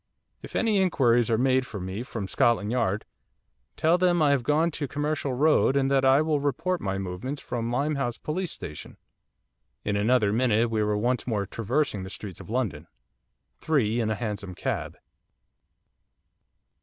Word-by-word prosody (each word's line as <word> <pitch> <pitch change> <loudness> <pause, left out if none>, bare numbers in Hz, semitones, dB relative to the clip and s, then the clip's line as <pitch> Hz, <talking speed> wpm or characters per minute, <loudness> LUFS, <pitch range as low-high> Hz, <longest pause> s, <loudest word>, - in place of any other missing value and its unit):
If - - -10
any 215 -4 +2
inquiries 120 - +3
are 115 - +2
made 130 +1 +3
for 105 -5 -7
me 95 +4 -4
from 115 -5 -5
Scotland 110 0 +2
Yard, 110 -4 0 0.7
tell 165 +3 +3
them 180 -1 +3
that 155 - +3
I 145 - +4
have 140 -2 +2
gone 150 +6 +2
to 150 -1 -3
the - - -24
Commercial 145 -2 -1
Road, 140 -1 +3
and 135 0 +1
that 135 -1 +3
I 135 +3 +5
will 155 -2 +1
report 165 +6 -1
my 95 -1 -2
movements 95 +9 -4
from 120 -3 -4
Limehouse 135 -1 -1
Police 175 +3 -3
Station.' 75 -2 -8 0.9
In 105 - 0
another 105 0 +2
minute 115 -1 +2
we 110 -1 +1
were 105 0 +1
once 120 +4 0
more 105 -4 0
traversing 115 +2 -1
the 95 - -7
streets 95 -2 -8
of - - -11
London, 120 -3 -2 0.7
three 120 -7 +1
in 110 -2 0
a 110 - 0
hansom 100 -4 -5
cab. - - -3
125 Hz, 170 wpm, -26 LUFS, 105-145 Hz, 0.9 s, I